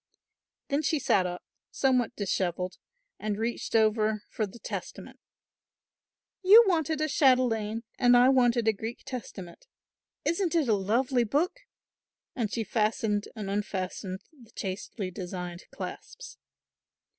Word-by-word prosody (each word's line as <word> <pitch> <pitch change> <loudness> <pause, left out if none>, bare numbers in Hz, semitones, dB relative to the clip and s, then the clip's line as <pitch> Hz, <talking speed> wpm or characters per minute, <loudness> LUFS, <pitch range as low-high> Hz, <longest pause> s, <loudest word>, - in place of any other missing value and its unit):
Then 280 +2 +1
she 310 +1 +1
sat 190 -9 +2
up 180 0 -6 0.3
somewhat 250 -3 +1
dishevelled 185 -2 -2 0.4
and 210 -1 -2
reached 230 +1 -3
over 215 -1 +2
for 215 -4 -1
the 195 - -12
Testament. - - -7 1.2
"You 415 +5 +9
wanted 320 -5 +1
a 310 - +2
chatelaine 235 -6 +2 0.2
and 245 -1 +6
I 250 +1 +6
wanted 245 -3 +3
a 220 - +5
Greek 225 +3 -6
Testament. 225 - -8 0.6
Isn't 340 +1 0
it 315 -5 +2
a 225 - +4
lovely 240 +6 +1
book?" 320 - 0 0.8
and 225 -5 -1
she 230 - -1
fastened 215 0 0
and 210 -3 -5
unfastened 190 -1 -3
the 245 -7 -18
chastely 190 0 -5
designed 180 -2 -6
clasps. - - -8
225 Hz, 125 wpm, -28 LUFS, 200-265 Hz, 1.2 s, You